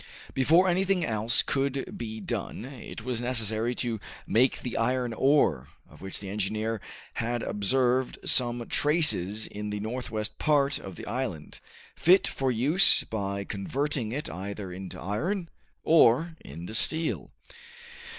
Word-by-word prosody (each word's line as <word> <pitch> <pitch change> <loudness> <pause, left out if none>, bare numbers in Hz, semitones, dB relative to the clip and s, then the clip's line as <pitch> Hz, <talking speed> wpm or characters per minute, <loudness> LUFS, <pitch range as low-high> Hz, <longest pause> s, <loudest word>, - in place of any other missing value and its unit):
Before 165 +8 +4
anything 185 0 +2
else 110 +1 +3
could 135 0 -1
be 110 -2 -5
done 110 - -4
it 130 -4 -9
was 120 -1 -2
necessary 115 -1 -1
to 115 -3 -2 0.3
make 125 +5 +3
the 125 - -5
iron 125 +1 0
ore, 110 - +3 0.2
of 75 - -17
which 95 0 -4
the 100 - -8
engineer 105 +2 -2 0.3
had 120 +1 -2
observed 125 +5 +1
some 120 -2 +2
traces 130 - +2
in 105 0 -5
the 105 0 -3
northwest 110 -1 -4
part 145 -2 +2
of 95 -2 -9
the - - -8
island, 120 - -4 0.4
fit 185 +3 +5
for 135 -1 -1
use 140 +11 +4
by 100 -2 -3
converting 120 +5 -2
it 145 +5 -3
either 95 +1 -6
into 95 0 -7
iron 170 - -2 0.3
or 160 +1 +5
into 85 +8 -8
steel. 160 +8 0
120 Hz, 135 wpm, -28 LUFS, 105-135 Hz, 0.4 s, fit